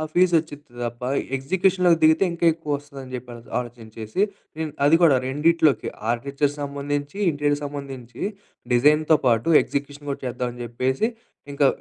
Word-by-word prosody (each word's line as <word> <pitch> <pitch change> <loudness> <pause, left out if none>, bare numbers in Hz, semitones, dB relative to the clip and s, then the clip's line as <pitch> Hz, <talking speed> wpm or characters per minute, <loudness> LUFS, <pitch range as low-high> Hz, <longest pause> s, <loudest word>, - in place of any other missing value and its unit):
ఆ - - -2
ఫీస్ 180 0 +4
వచ్చింది 150 -2 -7 0.2
తప్ప, 120 0 -5 0.4
ఎగ్జిక్యూషన్‌లోకి 180 +4 +2
దిగితే 160 +4 +5
ఇంకా 170 0 0
ఎక్కువ 155 -2 -8
వస్తదని 140 -2 -11
జెప్పి 125 0 -6
అల 120 - -10 0.2
ఆలోచించేసి 115 - -6 0.4
దిన్ 160 -1 -2
అది 155 +3 +6
కూడా 155 -6 +6
రెండిట్లోకి 150 +2 +2 0.2
ఆర్క్‌టేక్చర్‌ 140 +4 -1
సంబంధించి 145 +4 -3
ఇంటీరియర్ 145 0 0
సంబంధించి 135 -4 -7 0.5
డిజైన్‌తో 150 +5 +4
పాటు 115 +5 +3
ఎగ్జిక్యూషన్ 145 +1 -5
కూడా 140 - -4
చేద్దామని 125 0 -4
జెప్పేసి, 130 - 0 0.4
ఇంకా 140 0 +3
145 Hz, 135 wpm, -23 LUFS, 125-155 Hz, 0.5 s, అది